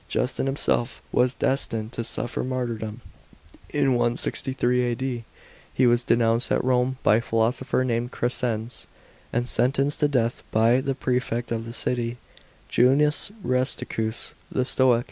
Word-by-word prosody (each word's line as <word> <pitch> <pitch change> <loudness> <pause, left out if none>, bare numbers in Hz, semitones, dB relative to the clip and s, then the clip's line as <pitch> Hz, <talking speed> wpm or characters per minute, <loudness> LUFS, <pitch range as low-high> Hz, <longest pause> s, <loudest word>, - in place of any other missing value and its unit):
Justin 130 +1 -1
himself 135 -2 0
was 125 +1 +2
destined 115 -5 -1
to 115 - -3
suffer 120 +1 -3
martyrdom. 120 -3 -3 0.7
In 145 -2 +2
163 125 +1 +1
A.D., 120 -1 -2 0.5
he 130 - +2
was 120 0 +4
denounced 115 -1 +2
at - - +2
Rome 125 0 +1
by 105 - +5
a - - 0
philosopher 120 +3 0
named 120 0 -1
Crescens, 120 -1 -2 0.4
and 120 +1 0
sen 125 +1 +3
tenced 140 +2 +1
to 150 - +4
death 120 -4 0
by 115 +4 +3
the 135 0 -2
prefect 125 -2 -1
of 115 -1 -2
the 115 - -7
city, 120 -1 0 0.5
Q. 120 - +3
Junius 150 +7 +2
Rusticus, 125 -3 -2 0.2
the 130 - 0
Stoic. 130 -2 +4
125 Hz, 145 wpm, -25 LUFS, 115-130 Hz, 0.7 s, by